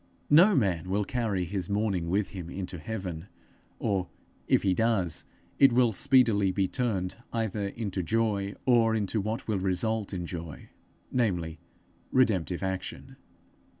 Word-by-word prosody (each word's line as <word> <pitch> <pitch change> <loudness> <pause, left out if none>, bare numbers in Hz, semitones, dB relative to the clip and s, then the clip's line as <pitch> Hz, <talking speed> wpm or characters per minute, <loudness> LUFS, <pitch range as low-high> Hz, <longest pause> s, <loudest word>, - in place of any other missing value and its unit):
No 180 +7 +7
man 90 -7 +1
will 100 +2 0
carry 105 -7 -1
his 90 0 -4
mourning 100 -5 0
with 100 +3 +1
him 90 -4 -7
into 90 -1 -6
heaven 90 -2 -5 0.5
or, 95 -3 -1 0.4
if - - +3
he 95 -2 +3
does, 100 -6 +1 0.3
it 135 -1 +7
will 120 -1 +4
speedily 110 -4 +4
be 95 0 +1
turned 100 -6 -2
either 110 -3 -1
into 100 -2 -3
joy, 100 0 0
or 115 -3 +4
into 105 0 0
what 110 +3 -4
will 105 -3 0
result 100 +3 -1
in 90 -3 -3
joy, 85 -3 -7 0.4
namely, 90 -10 0 0.5
redemptive 95 -8 +2
action. 95 -1 -5
100 Hz, 140 wpm, -28 LUFS, 90-115 Hz, 0.5 s, No